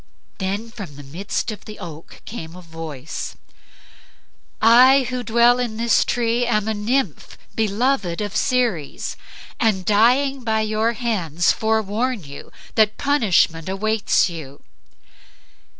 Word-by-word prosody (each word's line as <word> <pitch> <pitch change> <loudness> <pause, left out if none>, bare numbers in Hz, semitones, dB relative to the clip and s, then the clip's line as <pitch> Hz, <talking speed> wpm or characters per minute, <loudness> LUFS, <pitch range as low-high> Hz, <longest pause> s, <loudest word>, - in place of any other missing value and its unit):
Then 200 +4 -3
from 195 -11 -9
the 145 - -10
midst 180 - -3
of 215 - -10
the 215 - -9
oak 165 -4 -10
came 165 -7 -7
a 180 - -10
voice, 160 -4 -7 1.2
"I 255 +4 +6
who 250 0 -2
dwell 235 +2 +4
in 235 -3 -2
this 235 0 +3
tree 240 0 0
am 215 -3 +1
a 220 - 0
nymph 215 - -2 0.2
beloved 220 -3 0
of 210 -1 -4
Ceres, 240 - 0 0.4
and 205 -6 +1
dying 250 +6 +3
by 220 -1 +1
your 215 +2 0
hands 180 -8 0
forewarn 220 +1 0
you 140 -1 -11 0.2
that 215 -1 +3
punishment 190 - +2
awaits 215 +3 +1
you." 155 -6 -9
215 Hz, 125 wpm, -21 LUFS, 180-235 Hz, 1.2 s, I